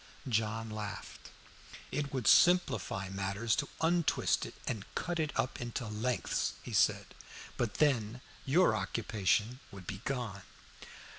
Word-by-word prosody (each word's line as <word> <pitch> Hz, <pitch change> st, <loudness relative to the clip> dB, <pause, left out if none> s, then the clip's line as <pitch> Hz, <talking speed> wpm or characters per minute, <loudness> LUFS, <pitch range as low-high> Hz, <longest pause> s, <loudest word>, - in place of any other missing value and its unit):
John 110 Hz, -1 st, 0 dB
laughed. 105 Hz, -1 st, -6 dB, 0.6 s
"It 140 Hz, 0 st, -2 dB
would 130 Hz, -5 st, -2 dB
simplify 110 Hz, -, +4 dB
matters 100 Hz, +4 st, 0 dB
to 145 Hz, -, -1 dB
untwist 170 Hz, 0 st, +2 dB
it -, -, -11 dB
and 105 Hz, -4 st, -2 dB
cut 175 Hz, -1 st, -2 dB
it 155 Hz, -1 st, 0 dB
up 130 Hz, -, -1 dB
into 120 Hz, 0 st, -3 dB
lengths," 110 Hz, +3 st, -1 dB
he -, -, -7 dB
said. -, -, +2 dB, 0.4 s
"But 115 Hz, -5 st, -1 dB
then 125 Hz, -5 st, +2 dB, 0.2 s
your 170 Hz, +7 st, +4 dB
occupation 110 Hz, +2 st, 0 dB
would 100 Hz, -2 st, -10 dB
be 95 Hz, +3 st, -6 dB
gone." 120 Hz, -8 st, -3 dB
115 Hz, 130 wpm, -33 LUFS, 105-135 Hz, 0.6 s, simplify